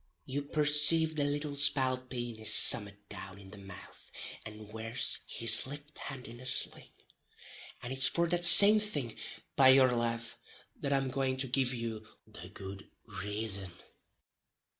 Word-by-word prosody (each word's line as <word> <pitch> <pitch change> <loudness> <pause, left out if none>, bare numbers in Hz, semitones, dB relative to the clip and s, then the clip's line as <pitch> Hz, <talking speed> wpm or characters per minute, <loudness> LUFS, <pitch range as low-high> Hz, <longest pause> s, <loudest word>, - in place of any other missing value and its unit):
You 140 +2 -5
percave 150 +2 +2
the 145 - -3
little 145 +1 -5
spalpeen 130 -4 -1
is 110 0 +4
summat 105 -3 +5
down 95 -1 -11
in 95 -1 -17
the 105 - -13
mouth, 95 -1 -14 0.3
and 105 0 -14
wears 115 +2 -5
his 115 0 +1
lift 145 +2 -12
hand 135 -2 -10
in 120 +1 -14
a 130 - -14
sling, 130 - -2 0.9
and 120 - -8
it's 135 0 +3
for 170 0 -3
that 175 0 -3
same 205 +5 +8
thing, 145 - -2 0.4
by 135 - +3
yur 130 -2 +3
lave, 115 -1 -5 0.4
that 140 - -7
I'm 135 -1 -3
going 130 0 -4
to 135 0 -5
give 130 0 -1
you 115 -2 -8 0.2
the - - -14
good 95 0 -13 0.2
rason. 105 -1 -5
130 Hz, 150 wpm, -28 LUFS, 110-145 Hz, 0.9 s, same